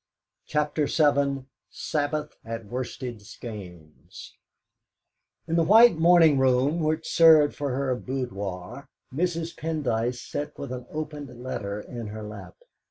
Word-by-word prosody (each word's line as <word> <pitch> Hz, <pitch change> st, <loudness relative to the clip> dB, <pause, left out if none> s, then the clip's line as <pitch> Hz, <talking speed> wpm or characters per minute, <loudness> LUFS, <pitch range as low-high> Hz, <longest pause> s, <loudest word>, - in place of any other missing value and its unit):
CHAPTER 150 Hz, 0 st, 0 dB
VII 140 Hz, -3 st, +2 dB, 0.2 s
SABBATH 150 Hz, 0 st, -2 dB
AT 115 Hz, 0 st, -6 dB
WORSTED 125 Hz, 0 st, -5 dB
SKEYNES 90 Hz, -8 st, -11 dB, 1.1 s
In 165 Hz, -, -1 dB
the 170 Hz, -, +4 dB
white 220 Hz, +5 st, +7 dB
morning 165 Hz, -3 st, +6 dB
room 130 Hz, +5 st, +2 dB
which 155 Hz, 0 st, -1 dB
served 160 Hz, -3 st, +6 dB
for 140 Hz, -3 st, -2 dB
her 135 Hz, -1 st, 0 dB
boudoir 110 Hz, -5 st, -5 dB, 0.3 s
Mrs. 170 Hz, +2 st, -2 dB
Pendyce 125 Hz, -7 st, -1 dB
sat 145 Hz, +4 st, -5 dB
with 140 Hz, -, -6 dB
an 125 Hz, -1 st, -6 dB
opened 150 Hz, -2 st, -6 dB
letter 100 Hz, -5 st, -4 dB
in 115 Hz, +1 st, -7 dB
her 110 Hz, +1 st, -7 dB
lap. 105 Hz, +1 st, -9 dB
140 Hz, 120 wpm, -26 LUFS, 115-155 Hz, 1.1 s, white